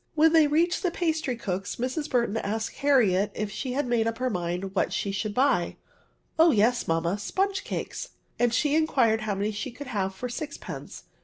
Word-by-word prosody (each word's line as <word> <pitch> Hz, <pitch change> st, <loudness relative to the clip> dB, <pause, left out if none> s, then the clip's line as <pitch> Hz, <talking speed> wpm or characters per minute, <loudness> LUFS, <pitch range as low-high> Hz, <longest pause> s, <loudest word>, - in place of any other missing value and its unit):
When 320 Hz, +1 st, +5 dB
they 320 Hz, -2 st, +6 dB
reached 335 Hz, +4 st, +2 dB
the 365 Hz, -, +1 dB
pastry 320 Hz, -6 st, -1 dB
cook's, 195 Hz, -4 st, -3 dB
Mrs. 260 Hz, +5 st, -3 dB
Burton 235 Hz, -4 st, +1 dB
asked 220 Hz, +1 st, -3 dB
Harriet 220 Hz, -9 st, +3 dB
if 210 Hz, -1 st, -3 dB
she 255 Hz, +4 st, -4 dB
had 285 Hz, +3 st, 0 dB
made 235 Hz, -2 st, +1 dB
up 230 Hz, 0 st, -2 dB
her 255 Hz, 0 st, -1 dB
mmd 180 Hz, +1 st, -3 dB
what -, -, +1 dB
she 200 Hz, -, -1 dB
should 205 Hz, +1 st, -3 dB
buy? 260 Hz, -9 st, +2 dB, 0.6 s
Oh 330 Hz, +1 st, +7 dB
yes, 240 Hz, -1 st, +2 dB
mamma, 165 Hz, +4 st, 0 dB
sponge 390 Hz, -, -1 dB
cakes;" -, -, -5 dB, 0.3 s
and 240 Hz, -1 st, +3 dB
she 290 Hz, +5 st, +1 dB
inquired 255 Hz, -9 st, +3 dB
how 215 Hz, -2 st, -1 dB
many 205 Hz, +2 st, -1 dB
she 215 Hz, +5 st, -4 dB
could 285 Hz, +4 st, -9 dB
have 195 Hz, -6 st, -2 dB
for 250 Hz, -, -4 dB
sixpence. 285 Hz, +4 st, -7 dB
240 Hz, 190 wpm, -27 LUFS, 205-290 Hz, 0.6 s, Oh